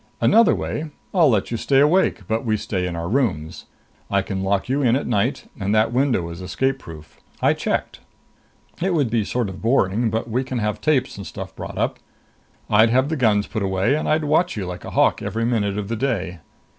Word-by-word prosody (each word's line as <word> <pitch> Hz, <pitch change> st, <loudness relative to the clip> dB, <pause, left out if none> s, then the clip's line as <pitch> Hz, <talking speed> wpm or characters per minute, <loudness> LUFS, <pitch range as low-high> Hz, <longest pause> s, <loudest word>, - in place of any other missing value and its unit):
Another 230 Hz, 0 st, +5 dB
way 155 Hz, +1 st, -4 dB, 0.2 s
I'll 170 Hz, -6 st, +5 dB
let 110 Hz, -3 st, +1 dB
you 115 Hz, -, -1 dB
stay 135 Hz, +3 st, +2 dB
awake, 150 Hz, -, +3 dB
but 110 Hz, +2 st, -1 dB
we 110 Hz, -3 st, +1 dB
stay 95 Hz, -3 st, -2 dB
in 85 Hz, -, -4 dB
our 85 Hz, 0 st, -4 dB
rooms. 95 Hz, -, -1 dB, 0.4 s
I 100 Hz, -1 st, +1 dB
can 95 Hz, -1 st, -4 dB
lock 95 Hz, 0 st, 0 dB
you 135 Hz, +3 st, 0 dB
in 120 Hz, -3 st, +3 dB
at 140 Hz, -, -1 dB
night, 105 Hz, -4 st, 0 dB
and 100 Hz, +2 st, 0 dB
that 110 Hz, +2 st, +2 dB
window 125 Hz, -9 st, +1 dB
is 85 Hz, +2 st, -8 dB
escape 130 Hz, +10 st, -1 dB
proof. 80 Hz, -, -12 dB, 0.2 s
I -, -, +3 dB
checked. -, -, -2 dB, 0.8 s
It 185 Hz, 0 st, +1 dB
would 140 Hz, -8 st, +1 dB
be 115 Hz, -2 st, +2 dB
sort 120 Hz, +2 st, -1 dB
of 95 Hz, -1 st, -8 dB
boring, 115 Hz, -1 st, +2 dB
but 110 Hz, +2 st, -2 dB
we 120 Hz, +3 st, -1 dB
can 130 Hz, -1 st, -4 dB
have 105 Hz, -2 st, -2 dB
tapes 135 Hz, -7 st, +1 dB
and 100 Hz, -3 st, -7 dB
stuff -, -, -8 dB
brought -, -, -7 dB
up. -, -, -1 dB, 0.7 s
I'd 110 Hz, +2 st, +5 dB
have 130 Hz, +4 st, +2 dB
the 160 Hz, -, -1 dB
guns 105 Hz, -7 st, +2 dB
put 110 Hz, -, -4 dB
away 95 Hz, +5 st, +1 dB
and 155 Hz, -, -1 dB
I'd 155 Hz, 0 st, +2 dB
watch 155 Hz, 0 st, +1 dB
you 100 Hz, -, -3 dB
like 90 Hz, 0 st, -7 dB
a -, -, -6 dB
hawk -, -, +2 dB
every 115 Hz, +1 st, -2 dB
minute 105 Hz, -4 st, 0 dB
of 105 Hz, -1 st, -3 dB
the 115 Hz, -, -2 dB
day." 100 Hz, -9 st, -2 dB
115 Hz, 220 wpm, -22 LUFS, 100-135 Hz, 0.8 s, Another